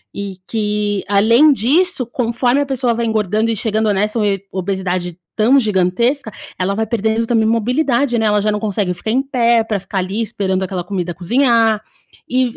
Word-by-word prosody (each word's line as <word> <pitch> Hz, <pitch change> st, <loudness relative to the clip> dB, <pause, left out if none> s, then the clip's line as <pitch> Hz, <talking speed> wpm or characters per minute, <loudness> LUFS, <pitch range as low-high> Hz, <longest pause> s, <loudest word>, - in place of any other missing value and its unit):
e 200 Hz, -2 st, -5 dB
que, 210 Hz, -2 st, -1 dB
além 230 Hz, +9 st, +5 dB
disso, 280 Hz, -, +1 dB
conforme 245 Hz, +3 st, 0 dB
a -, -, 0 dB
pessoa 255 Hz, -3 st, 0 dB
vai 235 Hz, 0 st, -2 dB
engordando 215 Hz, 0 st, 0 dB
e -, -, -1 dB
chegando 220 Hz, -1 st, 0 dB
nessa 210 Hz, +3 st, -1 dB
ob 200 Hz, -2 st, -1 dB
obesidade 185 Hz, -2 st, -3 dB, 0.2 s
tão 245 Hz, +6 st, +4 dB
gigantesca, 220 Hz, +5 st, 0 dB, 0.3 s
ela 195 Hz, +2 st, 0 dB
vai 220 Hz, +1 st, -1 dB
perdendo 220 Hz, +1 st, 0 dB
também 225 Hz, -2 st, +1 dB
mobilidade, 245 Hz, +2 st, +1 dB
né, 220 Hz, -, +1 dB
ela 210 Hz, 0 st, +2 dB
já 215 Hz, +1 st, +1 dB
não 210 Hz, -, -2 dB
consegue 205 Hz, -3 st, -1 dB
ficar 180 Hz, +5 st, -6 dB
em 265 Hz, +3 st, +1 dB
pé 235 Hz, -4 st, +2 dB
pra 215 Hz, -2 st, -2 dB
ficar 195 Hz, +1 st, -6 dB
ali 190 Hz, +4 st, -2 dB
esperando 195 Hz, -4 st, -2 dB
aquela 185 Hz, -1 st, -3 dB
comida 180 Hz, -1 st, -3 dB
cozinhar, 230 Hz, +2 st, +2 dB, 0.5 s
e 255 Hz, +1 st, +2 dB
220 Hz, 175 wpm, -17 LUFS, 200-235 Hz, 0.5 s, além